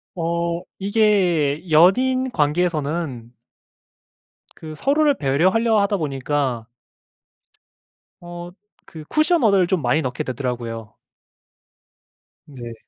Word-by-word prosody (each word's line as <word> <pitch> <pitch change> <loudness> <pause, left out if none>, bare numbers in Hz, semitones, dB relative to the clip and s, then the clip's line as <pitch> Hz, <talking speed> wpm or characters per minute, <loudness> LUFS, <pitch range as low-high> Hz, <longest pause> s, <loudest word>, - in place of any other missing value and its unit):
어 170 0 -2 0.2
이게 185 -7 +1
연인 255 +11 +3
관계에서는 150 - -1 1.2
그 155 -1 -9
서로를 290 - +2
배려하려 185 - +2
하다 200 0 +1
보니까 135 -5 -2 1.5
어 175 0 -9 0.3
그 160 -2 -11
쿠션 315 0 +2
언어를 200 -5 +4
좀 180 -2 0
많이 125 +6 +2
넣게 125 -4 -3
되더라고요. 120 -4 -5 1.5
네. 120 -6 -9
170 Hz, 190 characters per minute, -21 LUFS, 140-200 Hz, 1.5 s, 언어를